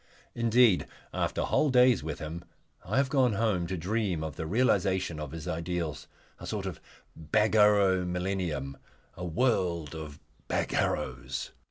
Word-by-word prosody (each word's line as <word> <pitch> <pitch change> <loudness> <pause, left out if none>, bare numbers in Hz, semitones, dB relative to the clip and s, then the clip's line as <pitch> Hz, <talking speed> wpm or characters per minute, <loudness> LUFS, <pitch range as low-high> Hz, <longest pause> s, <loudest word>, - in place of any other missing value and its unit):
Indeed, 115 -3 +4 0.3
after - - -1
whole 150 - +2
days 125 -4 +5
with 80 +1 -4
him 80 +3 -6 0.4
I 105 +7 -2
have 135 0 +3
gone 130 -4 +2
home 100 -5 0
to 95 +1 -3
dream 95 -2 -1
of 80 - -5
the 80 -3 -4
realisation 95 -5 +1
of 75 -2 -5
his 80 +2 -7
ideals, 85 -3 -3 0.3
a - - -8
sort - - -3
of - - -5 0.3
Bagarrow 105 +1 +3
millennium, 90 -7 -2 0.4
a 90 - -7
world 85 - 0
of 80 -2 -8 0.3
Bagarrows. 60 -1 -2
90 Hz, 140 wpm, -29 LUFS, 80-110 Hz, 0.4 s, days